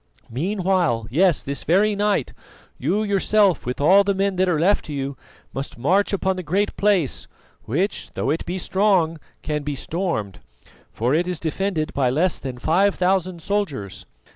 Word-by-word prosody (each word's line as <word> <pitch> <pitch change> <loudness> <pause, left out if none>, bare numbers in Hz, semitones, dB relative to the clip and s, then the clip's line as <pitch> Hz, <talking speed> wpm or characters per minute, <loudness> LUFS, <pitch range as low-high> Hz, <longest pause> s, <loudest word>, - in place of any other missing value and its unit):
Meanwhile, 175 - 0
yes, 175 +3 +3
this 140 +1 -3
very 205 +6 +3
night, 205 0 0 0.5
you 210 +2 0
yourself 200 - +2
with 125 - -3
all 190 +8 +6
the 200 0 0
men 195 0 0
that 185 0 +2
are 160 -4 +1
left 195 +6 +2
to 150 - -6
you 140 0 -3 0.4
must 135 -2 -5
march 185 +12 +2
upon 190 -1 0
the - - -3
Great 190 +5 -1
Place, 195 -9 +1 0.4
which, 170 - -2
though - - 0
it 160 - -1
be 180 +2 -4
strong, 185 -4 +1 0.2
can 150 -1 -2
be 145 0 -3
stormed, 145 - -3 0.5
for 120 +4 0
it 170 +3 +1
is 180 -3 -2
defended 170 0 -2
by 135 -3 +1
less 160 +7 +1
than 130 -2 -6
five 185 +10 +2
thousand 185 -2 0
soldiers. 130 - -3
180 Hz, 165 wpm, -22 LUFS, 145-195 Hz, 0.5 s, all